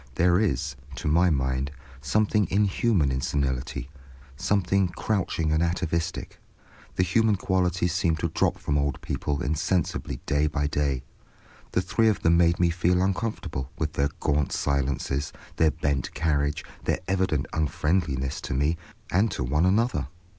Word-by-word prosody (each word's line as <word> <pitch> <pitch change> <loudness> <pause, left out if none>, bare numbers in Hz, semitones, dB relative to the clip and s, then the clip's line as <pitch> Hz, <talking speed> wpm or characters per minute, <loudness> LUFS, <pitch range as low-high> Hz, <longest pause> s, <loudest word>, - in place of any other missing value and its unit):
There 90 +1 +4
is, 105 -3 0 0.2
to 65 - -4
my 85 +4 +4
mind, 65 -2 0 0.3
something 105 +7 +2
inhuman 100 - +2
in 65 0 -1
senility, 65 -3 -2 0.5
something 95 +3 +1
crouching 85 -4 -1
and 80 +1 +2
atavistic; 85 -1 -2 0.6
the 90 - +3
human 110 +4 +3
qualities 90 -2 0
seem 85 -3 +2
to 80 - -2
drop - - +1
from 75 0 0
old 70 -2 -1
people 70 -1 -2
insensibly 80 -2 -1
day 75 +1 +2
by 75 -1 -1
day. 70 -3 0 0.7
The 90 - +2
three 110 +5 +2
of 105 - -1
them 85 +1 +5
made 85 0 +3
me 85 -1 +3
feel 90 +1 +2
uncomfortable 95 - -2
with 75 -1 -2
their 70 +1 +1
gaunt 70 -1 +1
silences, 70 0 -1 0.3
their 80 - +5
bent 70 -2 -2
carriage, 75 -1 0 0.2
their - - +1
evident 95 -7 +1
unfriendliness 75 -3 0
to - - -3
me 75 +5 +1 0.3
and 100 +5 +3
to 95 -8 -3
one 75 +8 +2
another. 115 - +1
80 Hz, 145 wpm, -26 LUFS, 70-90 Hz, 0.7 s, them